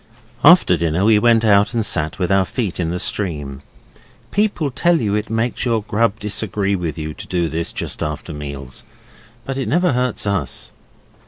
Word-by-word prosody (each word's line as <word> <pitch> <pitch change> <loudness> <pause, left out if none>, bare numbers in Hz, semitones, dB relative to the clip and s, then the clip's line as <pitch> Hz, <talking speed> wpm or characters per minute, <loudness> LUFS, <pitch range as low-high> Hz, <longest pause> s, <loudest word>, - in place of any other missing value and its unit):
After 165 - +6
dinner 85 +3 0
we 110 -1 +5
went 115 0 +4
out 105 +2 +4
and 115 -2 +1
sat 80 -5 -1
with 90 -1 -1
our 95 0 +4
feet 100 -1 -3
in 85 -2 -1
the 90 - -2
stream. 75 -9 -2 0.7
People 195 -8 0
tell 170 +6 +2
you 105 -5 -1
it 105 +1 -1
makes 115 +2 -1
your 115 -3 0
grub 110 0 0
disagree 100 -1 -1
with 85 -4 -4
you 80 -1 -4
to - - -10
do 85 -2 0
this 80 +2 -3
just - - -3
after 75 +2 -4
meals, 70 -3 -7 0.6
but 135 0 -3
it 135 - -2
never 175 +2 +2
hurts 125 -3 -1
us. 100 -2 -2
100 Hz, 180 wpm, -19 LUFS, 85-115 Hz, 0.7 s, After